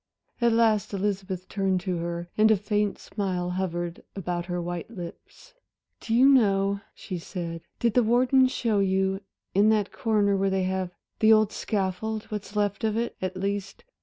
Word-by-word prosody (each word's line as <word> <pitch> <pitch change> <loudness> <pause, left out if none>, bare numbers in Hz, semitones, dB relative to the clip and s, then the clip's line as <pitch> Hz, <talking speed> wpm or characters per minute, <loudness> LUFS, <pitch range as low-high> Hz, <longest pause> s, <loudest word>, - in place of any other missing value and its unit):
At 235 0 +4
last 220 -3 +2
Elizabeth 190 -2 -2
turned 190 -2 0
to 185 -2 -2
her, 170 0 -4
and 215 +1 +5
a 220 - +5
faint 205 0 0
smile 180 -3 -3
hovered 175 -2 -3
about 175 -2 -3
her 175 -1 -2
white 175 +1 -4
lips. 205 - -10 0.5
"Do 225 - -1
you 255 +3 +6
know," 200 -6 +3
she 185 -4 -6
said, 170 -1 -5 0.2
"did 235 -2 +2
the 250 - +5
warden 250 +3 +4
show 230 -5 0
you? 190 0 +1 0.3
in 205 +3 +5
that 210 -2 +2
corner 210 -3 +1
there 195 0 +2
they 190 -1 0
have 185 0 -1 0.3
the 220 0 +6
old 215 -1 +5
scaffold 210 +1 -2
what's 210 0 -5
left 205 +1 0
of 220 0 +1
it, 235 +1 -2
at 185 0 -3
least. 200 +1 -3
200 Hz, 170 wpm, -26 LUFS, 185-215 Hz, 0.5 s, you